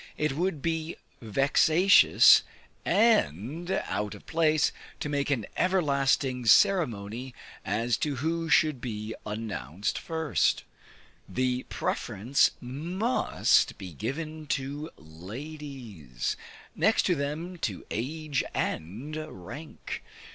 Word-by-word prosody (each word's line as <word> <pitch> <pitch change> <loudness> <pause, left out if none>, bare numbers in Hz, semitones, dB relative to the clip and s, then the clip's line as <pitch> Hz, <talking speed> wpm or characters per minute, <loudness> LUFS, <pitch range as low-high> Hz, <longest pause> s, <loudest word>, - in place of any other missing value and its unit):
It 150 -2 0
would 165 -3 -1
be 160 -1 -1 0.3
vexatious 150 - +6 0.4
and 170 - +2
out 105 - -2
of - - -14
place 155 -2 +2 0.3
to 150 - -3
make 145 -1 -1
an 125 -7 0
everlasting 140 -8 +1
ceremony 125 - +3 0.3
as 115 +2 0
to 145 -2 -1
who 165 +4 -2
should 155 -6 +3
be 110 -2 -4
announced 105 - -3
first; 160 -6 0 0.7
the 125 0 -1
preference 120 +8 +1
must 175 - +1
be 95 -4 -8
given 155 - -5
to 145 +3 -3
ladies; 105 - -6 0.4
next - - +3
to 180 - +2
them, 160 +4 -3
to 105 - -3
age 145 +4 -2
and 115 - -3
rank. 140 - -8
140 Hz, 100 wpm, -28 LUFS, 110-160 Hz, 0.7 s, vexatious